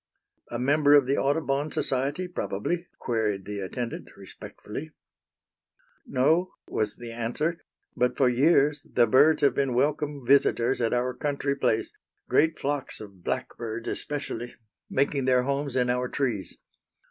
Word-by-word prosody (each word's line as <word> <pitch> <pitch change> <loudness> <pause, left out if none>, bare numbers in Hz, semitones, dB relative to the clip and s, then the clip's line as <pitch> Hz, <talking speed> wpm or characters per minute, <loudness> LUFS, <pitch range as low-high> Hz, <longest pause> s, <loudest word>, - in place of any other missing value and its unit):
"A 120 - -3
member 145 +3 +4
of 140 -3 +6
the 135 +2 +1
Audubon 145 0 0
Society, 140 +7 -1
probably," 175 - -3
queried 110 -5 -1
the 105 0 -5
attendant, 115 +5 -5
respectfully. 155 +9 -7 1.1
"No," 160 - +2
was 105 -1 0
the 120 -1 -8
answer, 120 +9 -2 0.4
"but 125 0 +1
for 135 - +4
years 145 +3 +3
the 120 - +3
birds 140 +8 +5
have 140 - +5
been 135 -3 0
welcome 145 0 0
visitors 130 -2 +3
at 115 - +1
our 125 +1 0
country 140 0 -1
place, 120 -5 0 0.3
great 160 +1 +3
flocks 145 -1 -3
of 100 -4 -12
blackbirds, 115 0 -4
especially, 120 -5 -4 0.3
making 140 0 +1
their 125 -1 +4
homes 140 0 -2
in 125 -1 +2
our 125 0 0
trees. 115 -10 -2
130 Hz, 135 wpm, -27 LUFS, 120-145 Hz, 1.1 s, of